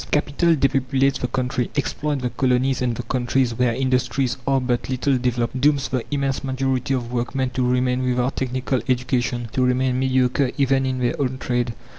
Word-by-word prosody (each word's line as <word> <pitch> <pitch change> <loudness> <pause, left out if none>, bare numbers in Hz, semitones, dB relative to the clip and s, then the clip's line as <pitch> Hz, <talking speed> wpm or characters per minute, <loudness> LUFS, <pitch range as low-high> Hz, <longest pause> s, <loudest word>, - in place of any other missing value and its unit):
Capital 150 +3 +2
depopulates 135 -1 +1
the 125 - -1
country, 125 -1 -1
exploits 145 -1 -1
the 125 - -1
colonies 130 +1 +1
and 120 -2 0
the 125 - -5
countries 125 0 0
where 120 0 +1
industries 130 -1 0
are 135 -1 +3
but 125 -1 -1
little 135 +1 +1
developed, 125 0 -1
dooms 145 -2 +2
the 130 -3 -1
immense 140 -2 -1
majority 135 0 -1
of 120 -2 -4
workmen 125 +2 -1
to 130 - -2
remain 125 0 +1
without 125 +1 0
technical 130 0 -1
education, 125 -1 0
to 130 - +1
remain 125 0 +1
mediocre 130 0 +2
even 135 -1 +2
in 130 0 -1
their 125 +2 -1
own 130 -1 -1
trade. 120 -2 -1
130 Hz, 175 wpm, -22 LUFS, 125-135 Hz, -, are